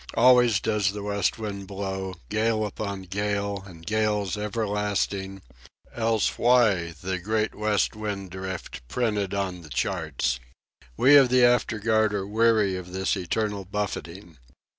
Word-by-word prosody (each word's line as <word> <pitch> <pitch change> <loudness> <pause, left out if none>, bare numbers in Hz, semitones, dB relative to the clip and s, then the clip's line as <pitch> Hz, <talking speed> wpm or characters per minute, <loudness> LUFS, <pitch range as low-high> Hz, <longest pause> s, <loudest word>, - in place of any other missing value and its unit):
Always 120 -3 +5
does 105 -3 0
the 105 -1 -6
west 100 -1 0
wind 100 -3 -5
blow, 95 -1 -4
gale 110 0 +1
upon 100 -2 -5
gale 100 +1 -2
and 85 -3 -13
gales 105 -2 0
everlasting, 105 -2 -2 0.5
else 115 -2 0
why 105 -9 +3
the 95 0 -2
"Great 110 +4 -1
West 105 0 0
Wind 100 -3 -5
Drift" 95 -5 -6
printed 105 - -1
on 95 -3 -2
the 75 - -13
charts! 65 -1 -1 0.6
We 145 +3 +7
of 135 -3 +6
the 125 0 +5
afterguard 110 -3 +2
are 95 -1 -2
weary 110 -2 +2
of 90 -1 -7
this 95 +1 0
eternal 100 +2 -2
buffeting. 95 -4 -5
100 Hz, 135 wpm, -26 LUFS, 95-110 Hz, 0.6 s, We